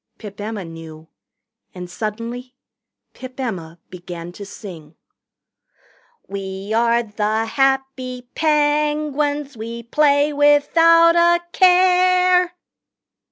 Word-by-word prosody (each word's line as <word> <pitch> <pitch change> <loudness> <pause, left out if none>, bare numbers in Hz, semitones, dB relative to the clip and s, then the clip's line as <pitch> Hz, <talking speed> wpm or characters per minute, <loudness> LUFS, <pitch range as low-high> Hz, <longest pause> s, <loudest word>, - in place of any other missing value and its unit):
Pip 205 -2 -10
Emma 210 -3 -5
knew. 160 -1 -12 0.7
And 180 -1 -7
suddenly 230 +6 -6 0.6
Pip 255 0 -11
Emma 175 -10 -5
began 175 -1 -9
to 200 +2 -10
sing. 165 -7 -11 1.3
"We 195 +1 -6
are 235 +1 +2
the 215 0 -2
happy 265 0 -1
Penguins 295 -1 0
We 230 +1 -7
play 290 +3 +2
without 330 +4 +4
a 345 0 +4
care 365 -1 +3
250 Hz, 90 wpm, -20 LUFS, 205-300 Hz, 1.3 s, without